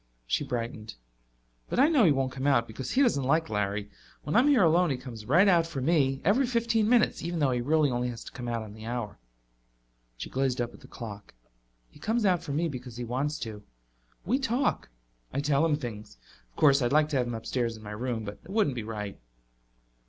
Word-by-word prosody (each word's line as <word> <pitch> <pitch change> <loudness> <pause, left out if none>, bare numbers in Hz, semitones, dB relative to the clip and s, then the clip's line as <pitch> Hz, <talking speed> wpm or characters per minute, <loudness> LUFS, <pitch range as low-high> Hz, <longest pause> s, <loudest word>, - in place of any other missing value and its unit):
She - - 0
brightened. 115 -4 -5 0.7
"But - - -2
I 275 - +7
know 290 -9 +4
he 160 - +6
won't 135 -2 0
come 130 +2 -3
out 125 -5 +3
because 115 +3 -7
he 275 - +3
doesn't 185 - +2
like 155 +1 +1
Larry. 105 0 -2 0.3
When 150 - -3
I'm 245 +5 +5
here 270 -8 +5
alone 170 +1 +4
he 135 - -1
comes 120 -4 -9
right 175 +10 +5
out 170 -3 +4
for 165 -5 -5
me, 135 -2 +2
every 240 +8 +3
fifteen 230 -2 +1
minutes, 240 -2 +3
even 170 +1 -3
though 145 -4 +2
he 125 -1 0
really 150 +2 +2
only 125 0 -1
has 115 -2 -7
to - - -10
come 125 -2 -7
out 115 -1 -2
on 105 -1 -10
the 110 0 -11
hour." 120 - -4 1.0
She - - -6
gazed 130 -1 -1
up 120 -1 -2
at - - -14
the - - -15
clock. 105 - -9 0.6
"He - - -17
comes 225 0 0
out 180 -3 +3
for 165 -4 -6
me 160 +4 0
because 125 -5 -7
he 125 - -4
wants 135 +6 -2
to. 110 -3 -6 0.6
We 250 +7 +1
talk; 265 - 0 0.4
I 140 - -1
tell 145 +1 +2
him 160 -2 +3
things. 110 - -7 0.3
Of - - -36
course, 140 -1 +5
I'd 120 -1 +1
like 155 +1 +4
to 145 - 0
have 125 -1 +1
him 120 - -3
upstairs 115 0 -2
in 110 - -14
my 105 - -7
room, 115 +1 -3
but 100 0 -7
it 165 - -16
wouldn't 195 - +1
be 120 - -3
right." 105 -2 -6
135 Hz, 225 wpm, -28 LUFS, 115-170 Hz, 1.0 s, I